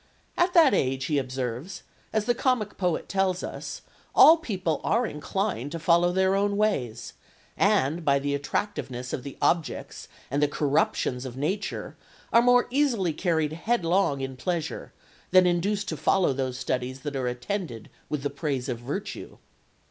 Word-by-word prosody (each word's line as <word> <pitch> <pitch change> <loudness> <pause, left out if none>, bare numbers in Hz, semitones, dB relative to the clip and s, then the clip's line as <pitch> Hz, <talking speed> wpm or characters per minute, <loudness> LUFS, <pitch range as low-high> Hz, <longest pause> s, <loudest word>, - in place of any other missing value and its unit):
"At 350 +1 +1
that 320 -8 +7
age," 135 -6 0
he 150 -3 +1
observes, 130 +5 -4 0.3
"as 215 -1 0
the 240 - +3
comic 240 -4 0
poet 180 -4 -1
tells 190 -2 0
us, - - -6 0.3
all 325 - +9
people 185 - -2
are 240 +2 +2
inclined 150 - -3
to 165 - -4
follow 170 +1 +3
their 190 +1 +2
own 200 +1 +1
ways, 200 - -1 0.4
and, 150 +6 +2
by 140 -2 +3
the 140 +1 -1
attractiveness 135 -4 -3
of - - -2
the 140 +1 -9
objects 170 -2 -1 0.2
and 140 +2 0
the 145 - +4
corruptions 140 -3 0
of 130 -1 -7
nature, 190 +9 -3 0.4
are 235 - +7
more 245 0 +5
easily 240 - +1
carried 160 -3 0
headlong 170 - +1
in 135 -1 -5
pleasure... 165 +3 -3 0.4
than 185 0 +6
induced 190 +3 0
to 160 - -3
follow 165 +1 +2
those 130 -1 -3
studies 130 0 -3
that 145 -2 -5
are 130 -2 -1
attended 125 - -4 0.2
with 150 -3 -3
the 145 - -1
praise 140 -3 -3
of 120 -3 -3
virtue." 145 - -6
165 Hz, 160 wpm, -26 LUFS, 135-200 Hz, 0.4 s, all